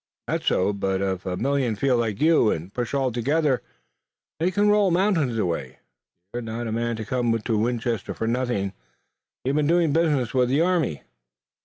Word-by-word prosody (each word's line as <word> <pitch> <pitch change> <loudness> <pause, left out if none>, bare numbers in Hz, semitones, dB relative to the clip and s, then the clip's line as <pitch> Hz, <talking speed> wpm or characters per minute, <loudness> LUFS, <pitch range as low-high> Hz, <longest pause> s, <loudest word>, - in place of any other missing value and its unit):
"That's - - -3
so, 95 +3 +2
but 95 -1 -1
if 95 -1 -2
a 90 -1 -2
million 135 -3 0
feel 130 +4 +2
like 115 -4 -1
you 155 -7 +4
and 85 +3 -3
push 120 +2 -3
all 135 -2 +1
together, 140 +3 +1 0.8
they 170 +3 +2
can 205 +3 +2
roll 205 -2 +4
mountains 170 - +1
away." 85 - -2 0.6
"You're 120 - -3
not 115 +1 -5
a 115 - -3
man 115 +1 -1
to 110 -1 -5
come 120 0 0
to 110 0 -1
Winchester 115 -2 -1
for - - -3
nothing. 115 -5 -1 0.7
You've 135 +3 +1
been 150 -1 +2
doing 165 -2 +3
business 150 -7 +1
with 125 -2 +2
the 140 +4 +2
army?" 170 - 0
120 Hz, 180 wpm, -24 LUFS, 110-150 Hz, 0.8 s, you